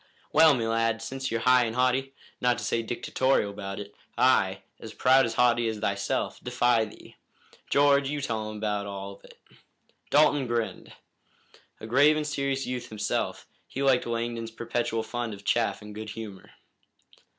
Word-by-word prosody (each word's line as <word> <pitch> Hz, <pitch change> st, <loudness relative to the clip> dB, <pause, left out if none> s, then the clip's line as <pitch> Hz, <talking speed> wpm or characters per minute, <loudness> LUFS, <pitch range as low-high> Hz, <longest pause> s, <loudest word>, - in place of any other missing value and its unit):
"Well, 160 Hz, -3 st, +7 dB
me 115 Hz, -2 st, -1 dB
lad, 115 Hz, 0 st, +1 dB
since 135 Hz, +2 st, -4 dB
you're 115 Hz, 0 st, -2 dB
high 125 Hz, 0 st, +5 dB
and 115 Hz, 0 st, -4 dB
haughty, 130 Hz, +2 st, +1 dB, 0.3 s
not 125 Hz, -1 st, +2 dB
to -, -, -6 dB
say 115 Hz, -, 0 dB
dictatorial 120 Hz, -1 st, 0 dB
about 100 Hz, -1 st, -6 dB
it, 100 Hz, 0 st, -8 dB, 0.2 s
I, -, -, +3 dB, 0.2 s
as -, -, -10 dB
proud 130 Hz, +1 st, +5 dB
and 115 Hz, -, -5 dB
haughty 120 Hz, -1 st, +3 dB
as 110 Hz, -1 st, -2 dB
thyself, 100 Hz, -1 st, -2 dB
defy 120 Hz, -2 st, +2 dB
thee. 105 Hz, -, -14 dB, 0.5 s
George, 140 Hz, -1 st, +4 dB
you 145 Hz, 0 st, -2 dB
tell 110 Hz, -5 st, -3 dB
him 110 Hz, 0 st, -7 dB
all 100 Hz, -2 st, -3 dB
about 100 Hz, -, -15 dB
it." -, -, -17 dB, 0.7 s
Dalton 145 Hz, -2 st, +4 dB
grinned. 115 Hz, -1 st, -3 dB, 0.9 s
A -, -, -8 dB
grave 145 Hz, +7 st, +4 dB
and 155 Hz, -, -1 dB
serious 140 Hz, -2 st, -1 dB
youth 125 Hz, -1 st, -5 dB
himself, 105 Hz, -1 st, -2 dB, 0.2 s
he 135 Hz, -, -4 dB
liked 130 Hz, -3 st, +3 dB
Langdon's 115 Hz, -1 st, -3 dB
perpetual 115 Hz, 0 st, -2 dB
fund 120 Hz, -2 st, -4 dB
of 100 Hz, -, -16 dB
chaff 115 Hz, -2 st, 0 dB
and 105 Hz, 0 st, -9 dB
good 110 Hz, +1 st, -7 dB
humor. 105 Hz, -4 st, -8 dB
120 Hz, 165 wpm, -27 LUFS, 110-130 Hz, 0.9 s, Well